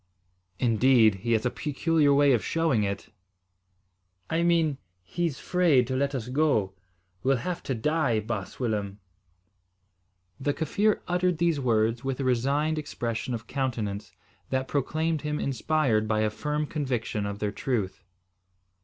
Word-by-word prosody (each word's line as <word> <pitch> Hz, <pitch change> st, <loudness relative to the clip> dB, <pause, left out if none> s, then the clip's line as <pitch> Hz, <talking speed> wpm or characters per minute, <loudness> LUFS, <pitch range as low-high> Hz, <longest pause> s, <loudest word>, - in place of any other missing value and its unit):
"Indeed! 120 Hz, -2 st, +4 dB
He 115 Hz, 0 st, 0 dB
has 110 Hz, +2 st, +1 dB
a 125 Hz, -, +1 dB
peculiar 150 Hz, 0 st, +1 dB
way 140 Hz, -1 st, +5 dB
of 115 Hz, -, +1 dB
showing 165 Hz, -9 st, +1 dB
it." 100 Hz, 0 st, -3 dB, 1.2 s
"I 165 Hz, +1 st, +2 dB
mean, 165 Hz, -5 st, +2 dB, 0.2 s
he's 165 Hz, -, -2 dB
'fraid 170 Hz, -9 st, +3 dB
to 130 Hz, +2 st, -3 dB
let 140 Hz, +1 st, 0 dB
us 120 Hz, -3 st, -4 dB
go. 130 Hz, -9 st, +1 dB, 0.5 s
We'll 135 Hz, 0 st, +2 dB
have 180 Hz, -1 st, -2 dB
to 135 Hz, -, -3 dB
die, 135 Hz, -2 st, +1 dB
baas 105 Hz, -3 st, -5 dB
Willem." 105 Hz, -5 st, -2 dB, 1.4 s
The 145 Hz, +1 st, -1 dB
Kaffir 205 Hz, +7 st, +1 dB
uttered 180 Hz, -1 st, +1 dB
these 165 Hz, -2 st, +1 dB
words 115 Hz, -2 st, +1 dB
with 135 Hz, -1 st, -2 dB
a -, -, -1 dB
resigned 140 Hz, +5 st, +1 dB
expression 120 Hz, -4 st, -3 dB
of 115 Hz, 0 st, -7 dB
countenance, 115 Hz, -7 st, -3 dB, 0.4 s
that 130 Hz, 0 st, -1 dB
proclaimed 155 Hz, +3 st, -1 dB
him 150 Hz, -1 st, -2 dB
inspired 130 Hz, -4 st, +1 dB
by 110 Hz, 0 st, +1 dB
a 110 Hz, -1 st, +1 dB
firm 150 Hz, +6 st, -2 dB
conviction 125 Hz, -9 st, -2 dB
of 100 Hz, 0 st, -4 dB
their 105 Hz, 0 st, -2 dB
truth. 105 Hz, -3 st, -2 dB
130 Hz, 145 wpm, -27 LUFS, 110-155 Hz, 1.4 s, way